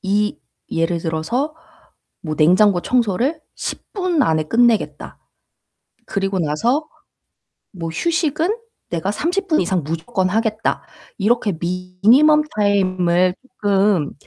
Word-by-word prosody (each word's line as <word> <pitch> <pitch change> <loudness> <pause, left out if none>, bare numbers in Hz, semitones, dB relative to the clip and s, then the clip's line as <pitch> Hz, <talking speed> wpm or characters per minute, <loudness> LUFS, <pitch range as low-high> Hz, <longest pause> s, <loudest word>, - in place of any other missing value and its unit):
이 205 +1 0 0.3
예를 165 +1 0
들어서 175 - -2 0.7
뭐 155 -3 -4
'냉장고 180 +4 +4
청소를 250 - 0
10 - - -5
분 365 -6 0
안에 160 -5 +2
끝내겠다. 235 +4 +1 0.9
그리고 195 -1 -1
나서 235 - 0 0.8
뭐 165 -4 -5
휴식은 330 - 0 0.3
내가 175 +3 -1
30 360 - -2
분 315 - +3
이상 180 -1 0
무조건 165 +6 -2
하겠다.' 220 +2 -1 0.4
이렇게 215 0 +1
미니멈 195 - +3
타임을 185 -3 +2 0.3
쪼끔 195 -6 +2
200 Hz, 215 characters per minute, -20 LUFS, 175-250 Hz, 0.9 s, 냉장고